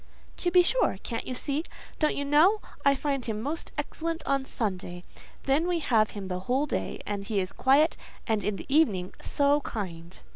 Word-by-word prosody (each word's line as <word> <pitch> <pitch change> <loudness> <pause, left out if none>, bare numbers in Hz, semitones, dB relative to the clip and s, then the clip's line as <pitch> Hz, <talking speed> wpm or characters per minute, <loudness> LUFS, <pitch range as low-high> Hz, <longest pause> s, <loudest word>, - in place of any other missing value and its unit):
"To 355 - 0
be 355 0 +6
sure! - - +2
Can't 230 - -4
you 255 - -3
see? 285 +4 -2 0.4
Don't 305 - +2
you 285 - -2
know? 320 +9 +5 0.2
I 280 0 +5
find 275 -1 -1
him 220 -3 -3
the 215 - -5
most 305 +5 -3
excellent 325 +3 -3
on 275 0 +1
a - - -10
Sunday; 185 -7 -3 0.4
then 285 +5 +2
we 355 -1 +1
have 230 -9 +2
him 195 -2 -5
the 180 -1 -3
whole 255 +9 0
day, 295 - -3
and 205 -1 -3
he 200 0 -1
is 185 0 -2
quiet, 280 +5 +3 0.3
and, 220 -2 0
in 210 - 0
the - - -8
evening, 220 - +2
so 285 +1 +2
kind." 175 -8 -6
270 Hz, 205 wpm, -28 LUFS, 205-300 Hz, 0.4 s, be